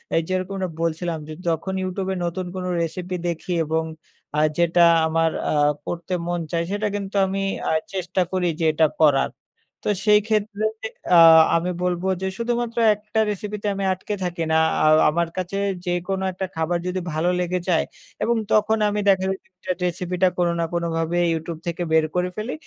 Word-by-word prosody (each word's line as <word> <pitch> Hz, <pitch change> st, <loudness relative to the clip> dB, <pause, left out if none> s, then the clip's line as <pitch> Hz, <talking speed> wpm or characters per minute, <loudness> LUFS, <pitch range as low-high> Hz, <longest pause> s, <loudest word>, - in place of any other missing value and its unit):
এই 165 Hz, -, +4 dB
যেরকম 185 Hz, +1 st, -2 dB, 0.2 s
বলছিলাম 165 Hz, 0 st, -1 dB
যে, 155 Hz, -, -7 dB
যখন 165 Hz, +3 st, -1 dB
YouTube 185 Hz, +1 st, -3 dB
এ -, -, -3 dB
নতুন 175 Hz, +2 st, -3 dB
কোন 185 Hz, -, -4 dB, 0.2 s
recipe 180 Hz, +2 st, -3 dB
দেখি 170 Hz, +1 st, -3 dB
এবং 160 Hz, +1 st, 0 dB, 0.5 s
আ -, -, +3 dB, 0.2 s
যেটা 170 Hz, 0 st, +4 dB, 0.2 s
আমার 165 Hz, 0 st, +1 dB, 0.2 s
আ -, -, +1 dB, 0.3 s
পড়তে 175 Hz, +2 st, -4 dB
মন 175 Hz, 0 st, -1 dB
চায় 170 Hz, 0 st, 0 dB
সেটা 205 Hz, +1 st, -1 dB
কিন্তু 200 Hz, -1 st, -5 dB
আমি 195 Hz, +1 st, -2 dB, 0.3 s
আ -, -, +1 dB, 0.2 s
চেষ্টা 185 Hz, 0 st, -1 dB
করি 185 Hz, -1 st, 0 dB
যে, 165 Hz, -, +1 dB
এটা 155 Hz, 0 st, +3 dB
করার 145 Hz, -3 st, +4 dB, 0.6 s
তো -, -, +2 dB, 0.2 s
সেই 210 Hz, -1 st, +6 dB
ক্ষেত্রে 215 Hz, -1 st, -1 dB, 0.5 s
আ -, -, +8 dB, 0.4 s
আমি 170 Hz, +2 st, 0 dB
বলব 180 Hz, -1 st, -1 dB, 0.2 s
যে, 190 Hz, -, -1 dB
শুধুমাত্র 235 Hz, 0 st, -2 dB, 0.2 s
একটা 210 Hz, +2 st, -3 dB
recipe 210 Hz, +1 st, -4 dB
তে -, -, -1 dB
আমি 195 Hz, -, -3 dB
আটকে 185 Hz, +3 st, -5 dB
থাকি 175 Hz, -1 st, -2 dB
না 160 Hz, -, +4 dB, 0.3 s
আ -, -, +4 dB, 0.2 s
আমার 170 Hz, +2 st, 0 dB
কাছে 185 Hz, +1 st, -3 dB, 0.3 s
যেকোনো 180 Hz, +2 st, -1 dB
একটা 190 Hz, +1 st, -4 dB
খাবার 160 Hz, +2 st, 0 dB
যদি 180 Hz, +1 st, -1 dB
ভালো 160 Hz, +3 st, +1 dB
লেগে 180 Hz, 0 st, -1 dB
যায় 170 Hz, -, +3 dB, 0.4 s
এবং 235 Hz, -, +2 dB, 0.2 s
তখন 215 Hz, +1 st, +3 dB
আমি 205 Hz, 0 st, -1 dB
দেখা 190 Hz, -1 st, +3 dB, 0.6 s
recipe 180 Hz, 0 st, -2 dB
টা 185 Hz, -, +6 dB
কোনো 175 Hz, -1 st, +2 dB
না 165 Hz, -, +1 dB
কোনোভাবে 170 Hz, 0 st, -1 dB, 0.2 s
YouTube 160 Hz, 0 st, -4 dB
থেকে 170 Hz, +1 st, -2 dB
বের 160 Hz, 0 st, +4 dB
করে 180 Hz, 0 st, +1 dB
ফেলি 215 Hz, +4 st, -4 dB
180 Hz, 175 wpm, -23 LUFS, 170-195 Hz, 0.6 s, আ